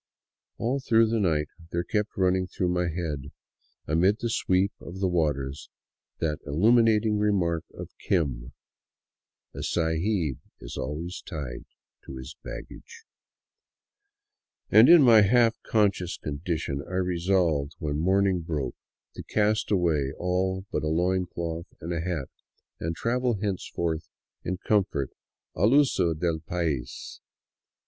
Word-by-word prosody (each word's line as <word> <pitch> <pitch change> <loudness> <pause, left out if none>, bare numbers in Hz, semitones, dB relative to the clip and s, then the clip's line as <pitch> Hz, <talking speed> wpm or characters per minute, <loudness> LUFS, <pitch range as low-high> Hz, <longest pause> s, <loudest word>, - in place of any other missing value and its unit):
All 130 +4 0
through 115 -4 +3
the 115 0 +1
night 80 -6 +1 0.2
there 85 0 -1
kept 105 +3 -2
running 95 0 +2
through 90 0 -1
my 90 0 +1
head, 80 -5 -4 0.5
amid 90 +7 +3
the 115 -1 -2
sweep 95 -2 +2
of 90 +3 -9
the 95 - +1
waters, 75 -6 -1 0.5
that 75 -2 -1
illuminat 110 +8 +4
ing 105 -1 +1
remark 90 -6 +1
of - - -8
" - - -55
Kim," 65 -9 0 0.5
" - - -62
A - - -6
sahib 80 - 0 0.2
is - - -8
always 80 +6 -4
tied 75 -9 -6 0.4
to 65 - -9
his 65 +3 -8
baggage 460 -1 -10 0.8
"; 410 0 -49
and - - +8
in 170 -3 +9
my 115 -4 +8
half 115 +2 +3
conscious 100 -5 +1
condition 75 -1 -3
I 90 - -4
resolved 85 -5 +1
when 75 -1 -2
morning 95 +2 +2
broke 75 -6 -3 0.4
to - - -7
cast 105 +1 0
away 80 -8 +1
all 95 +1 -1
but - - -1
a 75 - -2
loin 90 +3 +1
cloth 85 0 -5
and 85 +2 -4
a 85 - -1
hat, 85 -6 -3 0.5
and 80 0 -3
travel 125 +4 0
henceforth 85 -5 -3 0.3
in 90 +1 -2
comfort 95 - +1 0.4
al 105 - +3
uso 95 - +3
del 80 0 -1
pais. 80 -5 -4
90 Hz, 140 wpm, -27 LUFS, 80-105 Hz, 0.8 s, in